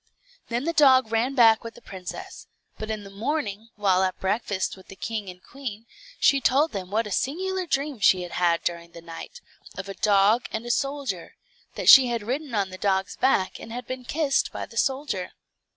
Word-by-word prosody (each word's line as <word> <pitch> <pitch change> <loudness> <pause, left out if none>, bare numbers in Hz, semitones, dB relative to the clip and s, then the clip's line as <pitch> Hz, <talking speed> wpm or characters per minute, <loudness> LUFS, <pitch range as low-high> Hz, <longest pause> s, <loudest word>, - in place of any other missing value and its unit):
Then 240 +2 -2
the 335 +2 -1
dog 260 -7 +5
ran 235 +4 0
back 225 -3 +6
with 230 0 -8
the - - -13
princess; 185 -4 -8 0.3
but 215 - -5
in 215 -1 -3
the 195 - -11
morning, 220 -1 -3
while 195 -3 +2
at 185 -1 -1
breakfast 195 -1 -1
with 190 - -17
the 195 - -11
king 215 -1 -4
and 180 0 -12
queen, 240 -5 -8 0.3
she 275 -1 +4
told 280 +6 +3
them 190 -3 -5
what 220 +3 0
a 210 - -7
singular 370 - -1
dream 280 -3 -1
she 185 -2 +4
had 175 - -8
had 170 -1 +1
during 170 0 -4
the 170 - -10
night, 170 - -9 0.4
of 195 0 -5
a 195 - -5
dog 210 +4 +3
and 220 +2 -4
a 240 - -1
soldier, 275 -10 -3 0.4
that - - -4
she 265 -2 +10
had 235 -3 -2
ridden 260 +3 -3
on 195 -2 0
the 185 - -9
dog's 190 -1 0
back, 250 -8 +1
and - - -10 0.2
been 255 0 -6
kissed 285 +1 0
by - - -5
the - - -16
soldier. 260 -7 -1
225 Hz, 200 wpm, -25 LUFS, 195-265 Hz, 0.4 s, she